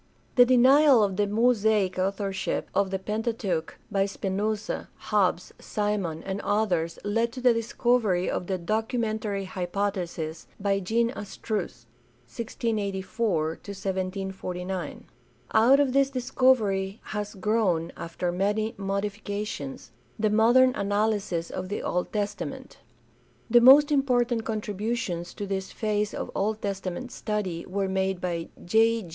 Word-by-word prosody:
The 245 - +7
denial 260 0 +6
of 195 -2 0
the 205 +1 +1
Mosaic 215 -3 +2
authorship 195 0 -2
of 195 0 +2
the 190 - -1
Pentateuch 210 -4 -2
by 195 0 +2
Spinoza, 205 +2 -2
Hobbs, 185 -4 0
Simon, 200 -6 -2
and 195 +1 -3
others 180 -6 0
led 230 +3 0
to 255 - -6
the 250 -1 +5
discovery 230 -4 +1
of 180 - -2
the 190 - -1
"documentary 215 +1 -1
hypothesis" 180 -3 -3
by 200 0 +1
Jean 230 +5 +1
Astruc 205 - -5 0.4
(1684 205 - -2 0.2
1749). 190 -2 -4 0.5
Out 240 +6 +6
of 275 -3 +2
this 275 0 +4
discovery 230 -6 +1
has 210 -1 -5
grown, 190 -5 +1
after 170 +1 -3
many 210 +4 0
modifications, 200 -5 -4 0.3
the 215 -1 +1
modern 240 +4 +5
analysis 205 -4 0
of 185 0 -5
the 205 - -3
Old 180 0 -1
Testament. 210 -1 -4 0.7
The 240 0 +7
most 280 +4 +8
important 245 -5 +2
contributions 210 -4 -3
to 205 - -4
this 190 -1 -3
phase 210 -1 -1
of - - -4
Old 210 +2 -1
Testament 195 +4 -4
study 195 -6 -3
were 195 +1 -1
made 190 -1 0
by 170 -2 -3 0.2
J. 225 +2 +3
205 Hz, 120 wpm, -27 LUFS, 190-225 Hz, 0.7 s, most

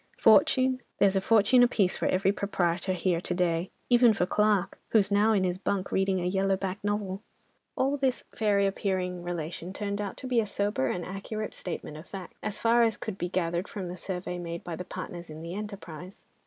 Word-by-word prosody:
Fortune? 260 0 +5 0.2
There's 195 -1 +4
a 195 - +2
fortune 225 +4 +5
apiece 215 -6 +3
for - - -1
every 190 +1 +2
proprietor 185 -2 0
here 180 -2 0
to 180 - -3
day—even 185 +7 +2
for 180 - +1
Clarke, 205 -1 +1
who's 205 -3 +3
now 205 +2 +4
in 200 -3 +3
his 180 0 -1
bunk 195 -1 -2
reading 190 -1 +1
a 175 - -2
yellow 195 +1 +1
back 190 +1 -4
novel." 205 -2 -2 0.5
All 275 +2 +1
this 265 -2 0
fairy 205 -2 +2
appearing 185 -2 -1
relation 175 +1 -5
turned 200 0 -3
out 200 -2 -5
to - - -8
be 250 -2 +2
a 215 - 0
sober 200 -11 0
and 175 +6 -2
accurate 210 +3 -5
statement 160 -4 -6
of 155 - -11
facts, 190 -3 -9
as 210 -1 -3
far 235 +1 +4
as 225 -2 +3
could 205 -3 -6
be 175 - -2
gathered 175 +1 -1
from 190 -4 -5
the 180 - -5
survey 180 0 -4
made 170 -1 -5
by 170 - -5
the 180 - -5
partners 175 -2 -7
in 155 +1 -8
the 170 +1 -6
enterprise. 195 -4 -8
195 Hz, 200 wpm, -28 LUFS, 180-210 Hz, 0.5 s, Fortune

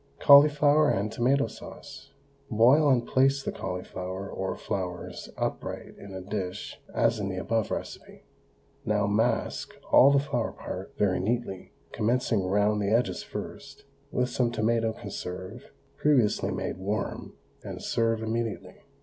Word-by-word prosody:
CAULIFLOWER 145 +1 +6
AND 100 +2 0
TOMATO 130 +4 +2
SAUCE. 110 0 -11 0.4
Boil 130 +7 +5
and 125 -3 +3
place 135 +1 +2
the - - -2
cauliflower 95 +1 -5
or 95 -1 -3
flowers 90 -2 -5
upright - - -4
in 100 - -10
a 95 - -5
dish 95 -1 -5
as 110 - +1
in 100 -1 -2
the 95 - -4
above 110 +3 -1
recipe. - - -7 0.6
Now 105 -1 +1
mask 110 +4 0 0.2
all 135 - +8
the 140 - +4
flower 135 -5 -1
part 95 +2 -8
very 95 -3 +2
neatly, 105 -1 -3 0.2
commencing 115 -3 0
round 105 +2 +2
the 100 - 0
edges 115 +3 +1
first, - - -8 0.3
with 125 0 0
some 120 -1 +1
tomato 115 0 +1
conserve 95 -3 -7 0.3
previously 130 -8 +2
made - - -3
warm, 100 +3 -3 0.3
and - - -7
serve 115 -1 0
immediately. 115 -1 -3
110 Hz, 135 wpm, -27 LUFS, 100-125 Hz, 0.6 s, all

